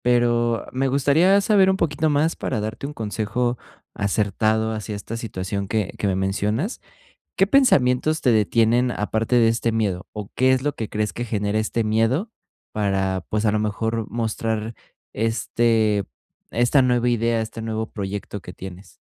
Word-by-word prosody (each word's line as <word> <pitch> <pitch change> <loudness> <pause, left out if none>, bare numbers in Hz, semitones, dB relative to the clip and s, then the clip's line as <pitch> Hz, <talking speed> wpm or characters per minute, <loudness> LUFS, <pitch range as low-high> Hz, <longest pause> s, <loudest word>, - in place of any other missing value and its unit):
pero 120 -1 +2
me 135 +1 0
gustaría 145 +8 +4
saber 195 -2 +4
un 190 - +3
poquito 155 -2 0
más 150 +2 +1
para 110 - -2
darte 110 +5 -4
un 150 - -7
consejo 115 +2 -2 0.4
acertado 110 +2 0
hacia 110 -1 -4
esta 110 +3 -6
situación 100 -3 -4
que 105 -2 -1
que - - -1
me 95 -2 +1
mencionas, 105 - -1 0.6
¿qué 195 - +4
pensamientos 155 - +3
te 125 - +3
detienen 115 +3 +3
aparte 110 +2 -1
de 115 -2 +5
este 115 0 0
miedo, 100 -4 -1
o 105 -1 -6
qué 130 +1 +4
es 130 - +1
lo 145 0 0
que 110 - -4
crees 105 0 -1
que 120 - -4
genera 105 -1 -1
este 110 +1 -1
miedo 115 - +1 0.4
para, 95 -3 -1
pues, 110 +1 0
a 105 - +3
lo 105 - +1
mejor, 110 +1 -2
mostrar 110 0 -2 0.4
este 110 -2 +1 0.5
esta 120 +4 +3
nueva 125 -1 +2
idea, 115 -1 +1
este 110 +1 -6
nuevo 110 0 -3
proyecto 100 0 -5
que 90 0 -10
tienes? 95 +1 -11
115 Hz, 165 wpm, -22 LUFS, 105-125 Hz, 0.6 s, de